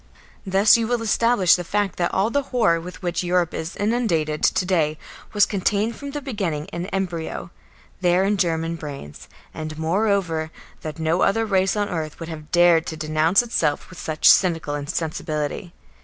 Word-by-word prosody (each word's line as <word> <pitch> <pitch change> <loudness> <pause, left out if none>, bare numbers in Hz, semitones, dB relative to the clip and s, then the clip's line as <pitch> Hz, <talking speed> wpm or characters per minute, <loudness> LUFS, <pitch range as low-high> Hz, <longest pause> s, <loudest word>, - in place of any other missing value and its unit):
Thus 195 +4 +5
you 230 -1 -1
will 240 -1 -1
establish 225 -4 +3
the 180 - -4
fact 205 +1 -1
that 175 -1 0
all 200 +4 +1
the 285 - +1
horror 170 -10 +2
with 180 +2 -10
which 175 0 -1
Europe 175 -1 +1
is 160 +2 -5
inundated 195 -9 0
to 185 - +2
day 160 -5 +1 0.3
was 205 -1 +4
contained 210 +3 0
from 285 - -7
the 290 0 -6
beginning 190 - -3
in 175 +2 -4
embryo 180 -4 -4 0.5
there 180 0 +3
in 200 +1 +1
German 165 -2 -1
brains, 140 - -9 0.2
and, 155 -1 -6
moreover, 170 -2 0 0.3
that 155 0 -6
no 160 +2 0
other 225 +3 +2
race 190 -2 +1
on 205 -1 0
earth 160 -5 -4
would 165 -1 -7
have 155 -2 -8
dared 175 -2 +4
to 160 - -5
denounce 155 +6 +2
itself 165 -10 -1
with 180 - -11
such 155 -1 0
cynical 165 -5 +4
insensibility. 150 +2 -3
175 Hz, 170 wpm, -22 LUFS, 160-200 Hz, 0.5 s, Thus